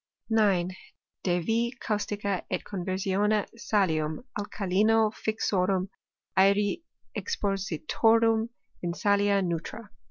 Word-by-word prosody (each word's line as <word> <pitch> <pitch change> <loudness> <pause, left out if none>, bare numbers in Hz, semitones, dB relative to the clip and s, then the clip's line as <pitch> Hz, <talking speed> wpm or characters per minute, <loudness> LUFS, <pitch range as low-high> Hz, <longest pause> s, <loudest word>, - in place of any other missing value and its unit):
9. 195 -5 +3 0.5
De 180 -1 +1
yi 230 +6 +1
caustica 205 -3 -2
et 185 - -2
conversione 195 +2 0
salium 175 -6 0 0.2
alkalino* 210 +2 +2
fixorum 195 -4 0 0.5
aeri 200 - +3 0.3
expositor 200 - +1
um 225 0 +2 0.3
in 175 -1 -2
salia 200 0 +2
neutra. 180 +5 -4
200 Hz, 90 wpm, -28 LUFS, 185-215 Hz, 0.5 s, 9